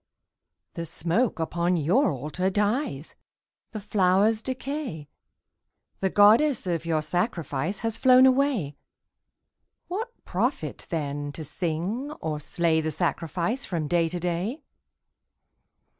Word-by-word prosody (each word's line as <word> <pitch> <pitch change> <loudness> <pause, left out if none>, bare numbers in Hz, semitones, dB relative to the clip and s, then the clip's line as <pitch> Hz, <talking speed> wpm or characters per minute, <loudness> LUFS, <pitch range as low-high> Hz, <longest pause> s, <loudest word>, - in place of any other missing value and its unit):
_) - - -53
The 170 -1 -5
smoke 175 +9 0
upon 170 +2 0
your 185 - +3
Altar 155 +7 -2
dies, 205 - -1 0.6
The 215 - -6
flowers 205 +2 +2
decay, 260 - -5 0.9
The 190 - +1
Goddess 220 +7 +5
of 170 -2 -2
your 155 -2 +1
sacrifice 170 - -2
Has 225 -1 -2
flown 255 0 +7
away. 255 - +2 1.1
What 430 +6 -3 0.2
profit, - - -2
then, 145 -3 -3
to 160 - -6
sing 175 - -2
or 155 - -4
slay 160 +1 +1
The 155 0 -2
sacrifice 170 - -1
from 165 -5 -3
day 170 0 +2
to 175 +1 -3
day? 180 - -2
180 Hz, 115 wpm, -26 LUFS, 160-225 Hz, 1.1 s, flown